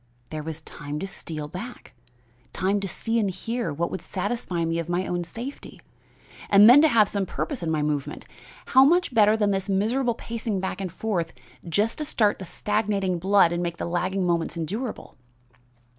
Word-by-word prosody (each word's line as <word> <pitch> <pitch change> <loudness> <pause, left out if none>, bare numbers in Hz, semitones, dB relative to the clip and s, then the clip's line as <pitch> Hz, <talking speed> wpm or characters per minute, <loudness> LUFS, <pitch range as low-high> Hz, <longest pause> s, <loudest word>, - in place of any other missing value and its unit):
There 155 -1 -4
was 160 +1 -6
time 150 -1 -7
to 160 - -3
steal 155 -5 -6
back, 195 +11 -9 0.6
time 195 +2 +1
to 195 - -3
see 225 +4 -1
and 205 -3 +1
hear 225 +1 -3
what 165 +4 -2
would - - -4
satisfy 185 -4 -2
me 165 0 -1
of 170 0 -4
my 175 +2 0
own 175 -1 -2
safety; 235 +11 -8 0.7
and 205 +1 +8
then 255 +5 +9
to 315 - +6
have 225 -7 +4
some 200 -2 -2
purpose 285 -5 -3
in 165 - -2
my 155 -2 0
movement! 150 -2 -3 0.4
How 265 0 +6
much 340 0 +3
better 215 -1 +5
than 205 -2 +2
this 195 0 -2
miserable 230 +5 +1
pacing 225 -3 -3
back 190 +1 -3
and 185 -3 -4
forth 180 -3 -2 0.4
just 210 - +1
to - - -1
start 220 -8 +1
the 190 - -6
stagnating 200 -2 -1
blood 195 -1 +4
and 175 0 -1
make 170 -1 -3
the - - -3
lagging 185 +2 -1
moments 170 -1 0
endurable! 210 +9 -5
195 Hz, 190 wpm, -25 LUFS, 170-225 Hz, 0.7 s, then